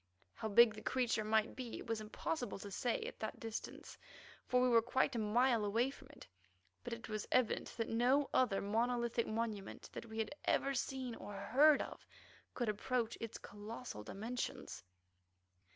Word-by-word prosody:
How 220 Hz, -, -4 dB
big 220 Hz, +1 st, +7 dB
the 215 Hz, -, -9 dB
creature 245 Hz, -4 st, +1 dB
might 220 Hz, +1 st, +2 dB
be 250 Hz, -3 st, -5 dB
it -, -, -8 dB
was 225 Hz, -1 st, -2 dB
impossible 245 Hz, +5 st, -3 dB
to 200 Hz, +1 st, -8 dB
say 240 Hz, +4 st, 0 dB
at -, -, -7 dB
that 220 Hz, -, -4 dB
distance, 225 Hz, -1 st, -6 dB, 0.5 s
for 250 Hz, -, +3 dB
we 250 Hz, -, +4 dB
were 235 Hz, -2 st, +6 dB
quite 260 Hz, +4 st, +1 dB
a -, -, 0 dB
mile 230 Hz, +2 st, +3 dB
away 230 Hz, +6 st, +2 dB
from -, -, -14 dB
it; -, -, -13 dB, 0.6 s
but -, -, -6 dB
it 230 Hz, 0 st, -5 dB
was 215 Hz, -1 st, -3 dB
evident 255 Hz, -3 st, +2 dB
that 230 Hz, -, -1 dB
no 255 Hz, +5 st, +3 dB
other 235 Hz, -7 st, +3 dB
monolithic 235 Hz, +2 st, +1 dB
monument 215 Hz, -3 st, -3 dB
that 235 Hz, -, -7 dB
we 220 Hz, 0 st, -8 dB
had 225 Hz, +3 st, -1 dB
ever 275 Hz, -, +2 dB
seen 260 Hz, -1 st, -2 dB
or 205 Hz, -2 st, -8 dB
heard 280 Hz, +9 st, +5 dB
of -, -, -9 dB, 0.5 s
could 240 Hz, -, -1 dB
approach 230 Hz, +2 st, 0 dB
its 230 Hz, -1 st, -4 dB
colossal 210 Hz, -, -7 dB
dimensions. 210 Hz, -, -5 dB
230 Hz, 170 wpm, -37 LUFS, 215-250 Hz, 0.6 s, big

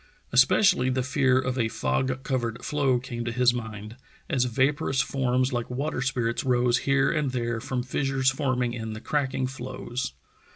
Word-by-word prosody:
Es 125 Hz, +2 st, +7 dB
pecially 130 Hz, -8 st, +3 dB
the 130 Hz, 0 st, 0 dB
fear 130 Hz, -1 st, +2 dB
of 130 Hz, 0 st, -1 dB
a 115 Hz, -, +2 dB
fog 130 Hz, +3 st, -1 dB
covered 125 Hz, -2 st, -2 dB
floe 140 Hz, -4 st, +2 dB
came 120 Hz, -1 st, -5 dB
to 120 Hz, -, -2 dB
his 125 Hz, +1 st, +3 dB
mind, 110 Hz, -1 st, -6 dB, 0.3 s
as 130 Hz, -5 st, +2 dB
vaporous 135 Hz, +2 st, +1 dB
forms 130 Hz, -1 st, +1 dB
like 120 Hz, -1 st, -2 dB
water 135 Hz, +1 st, -2 dB
spirits 120 Hz, -3 st, -1 dB
rose 125 Hz, -1 st, +2 dB
here 135 Hz, 0 st, +3 dB
and 150 Hz, -4 st, 0 dB
there 120 Hz, -2 st, -1 dB
from 125 Hz, +1 st, -2 dB
fissures 135 Hz, 0 st, +1 dB
forming 130 Hz, -3 st, -1 dB
in 110 Hz, -2 st, -5 dB
the 110 Hz, -, -6 dB
cracking 135 Hz, 0 st, -1 dB
floes. 125 Hz, -1 st, -5 dB
125 Hz, 170 wpm, -26 LUFS, 120-135 Hz, 0.3 s, Es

